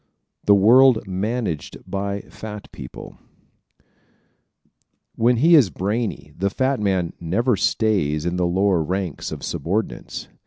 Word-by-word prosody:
The 100 - +6
World 120 +4 +5
Managed 95 - -3
by 100 0 -3
Fat 105 -1 -10
People 65 -3 -10 0.6
¶ - - -35 1.3
When 120 +2 +3
he 165 +8 +4
is 140 - +6
brainy 95 -6 -3
the 100 +3 0
fat 130 +5 0
man 95 -5 0
never 110 +9 +1
stays 90 -7 0
in 85 0 -1
the 90 -1 +1
lower 95 0 +2
ranks 90 0 -3
of - - -7
subordinates. 105 +6 -3
100 Hz, 125 wpm, -22 LUFS, 90-115 Hz, 1.3 s, The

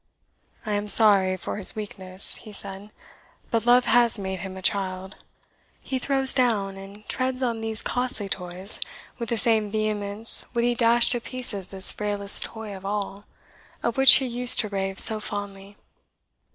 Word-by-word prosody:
"I 215 - -5
am 205 0 -3
sorry 195 -4 +4
for - - -6
his 200 - 0
weakness," 190 -3 -2
he 215 - -13
said, 200 0 -7 0.6
"but 230 -1 -2
love 245 +1 +3
has 240 -2 +3
made 190 -1 -6
him 190 +1 -9
a - - -10
child. 190 -1 -4 0.6
He 260 - -6
throws 270 0 +2
down 215 -7 -1
and 200 +2 -14
treads 255 0 -3
on 230 -3 -3
these 220 -1 -2
costly 245 -5 -3
toys 185 +1 -1 0.4
with 235 -2 -6
the 235 - -2
same 220 -1 0
vehemence 215 0 -1
would 235 - -1
he 240 0 0
dash 235 0 +1
to 240 -1 -3
pieces 230 -7 -2
this 190 -1 +5
frailest 205 -1 +2
toy 220 -3 -10
of 190 - -13
all, 200 0 -6 0.6
of 235 - -2
which 270 0 +8
he 265 - +3
used 245 0 +4
to 215 - -7
rave 195 -1 -5
so 220 +2 +7
fondly. 205 -1 -8
210 Hz, 165 wpm, -23 LUFS, 195-235 Hz, 0.6 s, which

